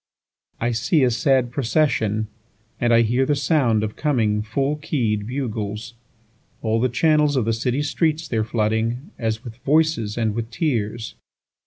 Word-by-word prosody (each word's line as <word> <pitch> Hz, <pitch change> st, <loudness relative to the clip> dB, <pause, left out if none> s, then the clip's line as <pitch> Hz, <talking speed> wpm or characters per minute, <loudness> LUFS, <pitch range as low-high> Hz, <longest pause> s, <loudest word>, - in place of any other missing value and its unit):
3I 120 Hz, 0 st, 0 dB
see 140 Hz, -, +2 dB
a 125 Hz, -, +3 dB
sad 130 Hz, 0 st, +2 dB
procession, 115 Hz, -5 st, +1 dB, 0.5 s
And 120 Hz, -1 st, +2 dB
I 115 Hz, 0 st, +6 dB
hear 120 Hz, +4 st, +2 dB
the 145 Hz, +2 st, +1 dB
sound 135 Hz, -7 st, +2 dB
of 105 Hz, -1 st, -3 dB
coming 115 Hz, -8 st, +1 dB
full 135 Hz, +7 st, -1 dB
key'd 115 Hz, -9 st, -1 dB
bugles; 115 Hz, -4 st, -4 dB, 0.7 s
All 110 Hz, 0 st, +1 dB
the 130 Hz, -, +2 dB
channels 150 Hz, +3 st, +3 dB
of 125 Hz, -5 st, +1 dB
the 115 Hz, -, +1 dB
city 125 Hz, +5 st, -1 dB
streets 160 Hz, +1 st, 0 dB
they're 110 Hz, -2 st, 0 dB
flooding, 115 Hz, -, -1 dB
As 110 Hz, 0 st, -2 dB
with 115 Hz, -2 st, -9 dB
voices 145 Hz, -6 st, +1 dB
and 110 Hz, -2 st, 0 dB
with 115 Hz, +1 st, -4 dB
tears. 115 Hz, -5 st, -2 dB
120 Hz, 155 wpm, -22 LUFS, 110-140 Hz, 0.7 s, I